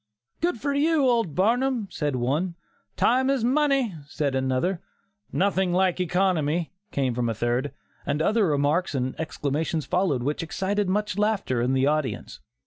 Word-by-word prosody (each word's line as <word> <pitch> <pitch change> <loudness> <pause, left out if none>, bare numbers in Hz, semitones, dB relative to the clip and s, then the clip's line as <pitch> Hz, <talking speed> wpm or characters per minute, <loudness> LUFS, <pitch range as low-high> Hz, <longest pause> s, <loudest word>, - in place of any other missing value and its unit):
"Good 340 -8 0
for 285 +2 -1
you, 300 +1 +2
old 230 - +1
Barnum," 240 +3 +1
said 145 -3 -2
one; 145 +9 -1 0.4
"Time 260 +2 +3
is 270 -4 +1
money," 270 -3 +2
said 145 -2 -2
another; 130 +7 0 0.5
"Nothing 190 -1 +1
like 185 0 +2
economy," 175 -3 +1 0.2
came 135 - 0
from 120 0 -1
a 115 - -2
third, 120 +5 -1 0.3
and 145 +1 -1
other 210 +5 +2
remarks 150 +3 +1
and 130 0 -1
exclamations 155 0 -2
followed 175 -9 0
which 145 +3 -1
excited 195 +4 -1
much 205 0 -1
laughter 205 - +1
in 125 +2 +1
the 135 0 +2
audience. 145 - -1
175 Hz, 150 wpm, -25 LUFS, 140-210 Hz, 0.5 s, Time